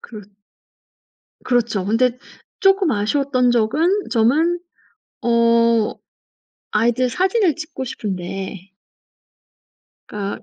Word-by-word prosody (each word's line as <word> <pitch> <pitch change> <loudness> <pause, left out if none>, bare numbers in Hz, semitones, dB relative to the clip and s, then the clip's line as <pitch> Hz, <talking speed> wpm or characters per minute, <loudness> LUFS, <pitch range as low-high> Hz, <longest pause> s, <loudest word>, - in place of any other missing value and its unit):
그렇 210 -4 -11 1.2
그렇죠. 235 -6 0
근데 240 +4 +1 0.4
쪼끔 390 -3 +3
아쉬웠던 250 +3 +1
적은 240 +8 +2 0.2
점은 305 +10 +2 0.6
어 230 -1 +3 0.8
아이들 240 +3 +1
사진을 375 - +1
찍고 315 -4 -6
싶은데 195 -4 -6 1.4
그러니까 205 -1 -5
235 Hz, 190 characters per minute, -20 LUFS, 215-280 Hz, 1.4 s, 쪼끔